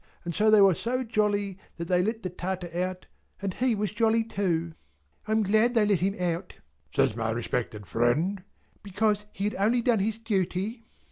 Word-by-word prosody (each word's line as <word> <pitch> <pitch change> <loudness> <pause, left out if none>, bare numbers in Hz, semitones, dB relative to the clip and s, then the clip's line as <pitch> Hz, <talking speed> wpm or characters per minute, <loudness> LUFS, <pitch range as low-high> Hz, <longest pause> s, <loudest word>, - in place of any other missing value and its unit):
And 170 - -3
so 215 +5 +3
they 215 -1 +7
were 195 -1 +7
so 250 +8 -2
jolly, 205 -4 0 0.2
that 170 - -4
they 180 +1 +2
let 220 +4 -2
the 185 - -3
Tartar 180 -1 -4
out, 185 +1 -2 0.3
and 195 -1 -3
he 250 +1 +1
was 205 -2 -1
jolly 225 +1 +2
too." 170 -7 -1 0.5
"I - - -3
am 220 0 +3
glad 220 +5 +3
they 220 -2 +4
let 205 -4 +2
him 195 +2 0
out," 175 -2 -2 0.4
says - - +3
my 115 -1 -1
respected 115 -2 -3
friend, 150 - +1 0.4
"because 210 +1 0
he 195 - -5
had 210 - 0
only 230 +4 +2
done 235 -3 +3
his 215 +2 -1
duty." 220 +1 -2
200 Hz, 190 wpm, -27 LUFS, 180-220 Hz, 0.5 s, they